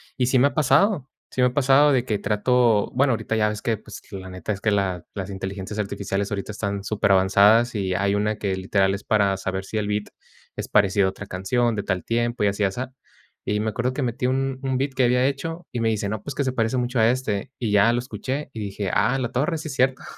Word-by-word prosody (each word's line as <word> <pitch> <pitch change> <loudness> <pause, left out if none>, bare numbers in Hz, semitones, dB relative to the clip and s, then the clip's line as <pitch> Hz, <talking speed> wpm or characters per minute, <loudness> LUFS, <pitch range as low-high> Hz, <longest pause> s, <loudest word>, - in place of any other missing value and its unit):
Y 125 -1 +1
sí 130 - +3
me 130 +3 +5
ha 140 - -4
pasado 150 - +2 0.2
sí 130 - -1
me 125 - +6
ha 125 - -4
pasado 145 +1 +5
de 130 -3 +2
que 105 -4 -1
trato, 110 +1 +2
bueno, 130 0 +3
ahorita 110 0 -2
ya 105 -1 +2
ves 105 0 -5
que, 115 - +1
pues, 110 +1 -11
la 95 -2 -7
neta 90 +2 -5
es 100 -1 -4
que 105 - +1
la 95 -4 0
las 100 -1 -5
inteligencias 95 +2 -5
artificiales 100 -1 -2
ahorita 100 +1 -3
están 100 -2 -3
superavanzadas, 100 +3 +4
y 95 -4 -1
hay 100 +2 +1
una 105 +1 0
que, 95 -2 -1
literal, 95 +1 +1
es 100 - -5
para 100 -2 +2
saber 95 0 -3
si 110 - -4
el 105 - -2
beat 105 0 -2 0.5
es - - -5
parecido 100 -1 +3
a - - +1
otra 95 +2 -8
canción, 110 +6 0
de 105 - -1
tal 95 -3 -2
tiempo, 120 -1 0
y - - +4
así 100 +1 -4
y 100 - +4
asá. 125 +7 -5 0.5
Y 105 0 0
me 110 0 -1
acuerdo 125 +5 -1
que 140 - -2
metí 125 +1 -1
un 135 0 -1
un 130 -2 -1
beat 135 +1 -1
que 130 -1 +2
había 125 +1 +3
hecho 165 +5 -3
y 120 - -3
me 115 -1 +1
dice: 105 -2 -1
"No, 110 0 -3
pues, 140 +4 -7
que 140 - 0
se 130 - 0
parece 115 0 0
mucho 125 0 -1
a 110 +1 +5
este". 120 -3 -2
Y 115 -4 -2
ya 105 +3 +5
lo - - +1
escuché 135 +3 -5
y 110 - -7
dije: 100 -2 -3
"A 115 +6 +2
la 125 -2 -2
torre, 150 +6 0
sí 155 0 -6
es - - -5
cierto". 130 0 +1
110 Hz, 255 wpm, -23 LUFS, 100-130 Hz, 0.5 s, me